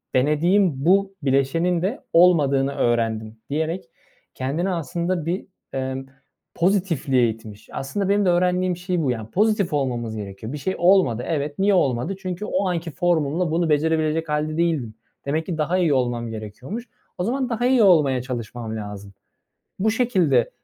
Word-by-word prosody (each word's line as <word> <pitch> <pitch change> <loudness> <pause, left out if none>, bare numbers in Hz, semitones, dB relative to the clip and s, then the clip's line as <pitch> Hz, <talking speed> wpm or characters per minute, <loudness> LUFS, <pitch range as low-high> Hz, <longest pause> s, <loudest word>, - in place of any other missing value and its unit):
denediğim 150 +2 +2
bu 195 +2 +3
bileşenin 155 +6 +1
de 215 - -1
olmadığını 140 -6 +4
öğrendim.” 115 -2 0
diyerek, 160 +3 -2 0.5
kendini 150 +9 -2
aslında 170 0 -2
bir, 175 +3 -2 0.3
ımm, 130 0 -3 0.5
pozitifliğe 165 - +2
itmiş. 110 -1 -9
Aslında 195 +8 -2
benim 205 0 +3
de 180 - +4
öğrendiğim 180 0 +1
şey 180 -1 -1
bu, 130 - +1
yani, 110 -2 -5
pozitif 205 -4 +1
olmamız 120 -5 -1
gerekiyor. 105 +3 -7
Bir 150 - -3
şey 190 +7 -2
olmadı, 175 - +3
evet. 150 -1 -2
Niye 200 +1 +3
olmadı? 135 +1 +1
Çünkü 185 +2 -4
o 200 -8 0
anki 170 -1 -3
formumla 165 0 0
bunu 165 0 +1
becerebilecek 155 +1 +1
hâlde 155 +1 -1
değildim. 150 -10 0 0.3
Demek 155 +3 -1
ki 170 -4 -4
daha 160 +4 +1
iyi 170 -6 +2
olmam 120 -3 0
gerekiyormuş. 115 - -7 0.3
O 180 - -1
zaman 255 +3 -1
daha 235 +1 -1
iyi 255 -4 +4
olmaya 145 -9 +4
çalışmam 120 -2 -5
lazım. 105 -2 -7 0.7
Bu 220 +3 +2
şekilde 185 - +2
155 Hz, 150 wpm, -23 LUFS, 130-180 Hz, 0.7 s, olmadığını